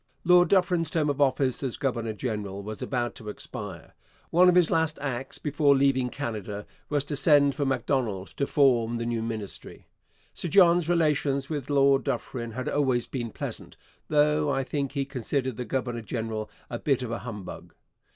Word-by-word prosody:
Lord 180 Hz, 0 st, +6 dB
Dufferin's 180 Hz, -3 st, +2 dB
term 150 Hz, -3 st, +1 dB
of 145 Hz, +1 st, -3 dB
office 135 Hz, -2 st, +2 dB
as 130 Hz, -4 st, -3 dB
governor 120 Hz, -6 st, -2 dB
general 105 Hz, -4 st, -4 dB
was 105 Hz, 0 st, -7 dB
about 120 Hz, -2 st, -2 dB
to 110 Hz, -4 st, -8 dB
expire. -, -, -7 dB, 0.4 s
One 180 Hz, +2 st, +6 dB
of 180 Hz, -, +3 dB
his 180 Hz, -2 st, +4 dB
last 160 Hz, -1 st, +1 dB
acts 135 Hz, -2 st, -3 dB
before 145 Hz, -1 st, +2 dB
leaving 135 Hz, -2 st, +2 dB
Canada 105 Hz, -7 st, -5 dB, 0.2 s
was 145 Hz, -2 st, +1 dB
to 145 Hz, +1 st, -4 dB
send 145 Hz, -1 st, +4 dB
for 140 Hz, +1 st, -1 dB
Macdonald 120 Hz, -7 st, -1 dB
to 140 Hz, -, 0 dB
form 120 Hz, -5 st, +3 dB
the 115 Hz, -, -3 dB
new 120 Hz, -1 st, -1 dB
Ministry. 110 Hz, -3 st, -6 dB, 0.5 s
Sir -, -, -4 dB
John's 175 Hz, -2 st, +5 dB
relations 150 Hz, -4 st, +1 dB
with 145 Hz, -3 st, -4 dB
Lord 140 Hz, -1 st, +4 dB
Dufferin 120 Hz, -3 st, -3 dB
had 130 Hz, +2 st, -4 dB
always 130 Hz, -5 st, +1 dB
been 120 Hz, -4 st, -4 dB
pleasant, -, -, -7 dB, 0.3 s
though 150 Hz, 0 st, +3 dB
I 135 Hz, -1 st, 0 dB
think 140 Hz, 0 st, -3 dB
he 140 Hz, -2 st, -1 dB
considered 130 Hz, -1 st, -2 dB
the 125 Hz, -, -4 dB
governor 120 Hz, -3 st, -2 dB
general 110 Hz, -1 st, -4 dB, 0.2 s
a 120 Hz, -, -5 dB
bit 135 Hz, -3 st, +1 dB
of 120 Hz, -, -4 dB
a 115 Hz, -, -3 dB
humbug. 105 Hz, -6 st, -8 dB
135 Hz, 175 wpm, -27 LUFS, 115-145 Hz, 0.5 s, Lord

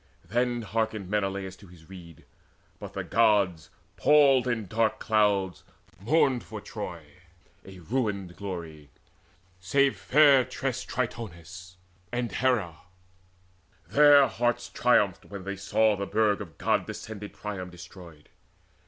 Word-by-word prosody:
Then 120 Hz, 0 st, 0 dB
hearkened 110 Hz, -3 st, -3 dB
Menelaus 95 Hz, -2 st, -2 dB
to 100 Hz, -, -16 dB
his 85 Hz, -2 st, -17 dB
rede. 85 Hz, -4 st, -13 dB, 0.5 s
But -, -, -9 dB
the -, -, -4 dB
Gods, 100 Hz, -7 st, +2 dB, 0.3 s
palled 140 Hz, -4 st, +5 dB
in 115 Hz, -3 st, -1 dB
dark 110 Hz, +3 st, 0 dB
clouds, 100 Hz, -4 st, +1 dB, 0.4 s
mourned 130 Hz, -, +2 dB
for 110 Hz, -, -8 dB
Troy, 95 Hz, -6 st, -7 dB, 0.6 s
A 95 Hz, -1 st, -12 dB
ruined 100 Hz, -2 st, -3 dB
glory 85 Hz, -7 st, -7 dB, 0.7 s
save 135 Hz, +9 st, +2 dB
fair 145 Hz, -3 st, +5 dB
tressed 130 Hz, 0 st, -4 dB
Tritonis 95 Hz, -7 st, -6 dB, 0.4 s
And 120 Hz, -1 st, -2 dB
Hera: 115 Hz, -11 st, 0 dB, 1.1 s
their 145 Hz, -1 st, +7 dB
hearts 120 Hz, 0 st, -1 dB
triumphed, -, -, +2 dB
when 100 Hz, -2 st, -9 dB
they 100 Hz, +1 st, -4 dB
saw 105 Hz, +3 st, +2 dB
The 100 Hz, 0 st, -4 dB
burg 105 Hz, -2 st, +1 dB
of 85 Hz, -7 st, -10 dB
god -, -, 0 dB
descended 105 Hz, -2 st, -8 dB
Priam 95 Hz, -3 st, -6 dB
destroyed. 90 Hz, -3 st, -13 dB
105 Hz, 120 wpm, -27 LUFS, 95-120 Hz, 1.1 s, their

